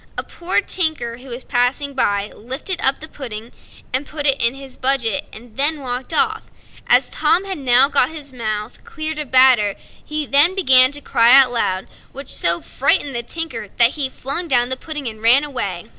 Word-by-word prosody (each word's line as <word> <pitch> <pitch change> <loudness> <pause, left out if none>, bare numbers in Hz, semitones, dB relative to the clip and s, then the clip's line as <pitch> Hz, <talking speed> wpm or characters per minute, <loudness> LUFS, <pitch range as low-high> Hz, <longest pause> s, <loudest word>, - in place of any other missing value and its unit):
A - - -2
poor 350 +3 -2
tinker, 315 -12 -2
who 255 +2 -15
was 245 0 -7
passing 265 +4 -1
by, 205 -5 -1
lifted 265 - -3
up 270 - +2
the 315 - -6
pudding, 235 -6 -9 0.5
put 295 -1 -7
it 275 -1 +2
in 235 +2 +2
his 270 -1 -11
bag, 265 -2 +1 0.3
and 270 +7 -3
walked 250 0 -6
off. 435 +8 -1 0.4
As - - +3
Tom 370 +3 +1
had 380 -4 -6
now 255 0 +5
got 280 -3 +1
his 295 -4 -9
mouth 215 -3 -5
cleared 310 -1 -4
of 300 - -5
the - - -26
batter, 255 -6 +4 0.3
he 300 0 -4
began 280 -4 +5
to 290 - -2
cry 240 +1 +5
aloud, 230 -7 -2 0.3
which 275 0 -6
so 170 0 +1
frightened 275 +1 -1
the 235 - -2
tinker 250 -4 -4
that 235 0 +5
he 280 -3 -1
flung 280 +7 -1
down 245 -4 +1
the 260 - 0
pudding 295 -1 -7
and 220 -1 -8
ran 245 +5 +5
away. 205 -12 -4
265 Hz, 185 wpm, -18 LUFS, 235-295 Hz, 0.5 s, now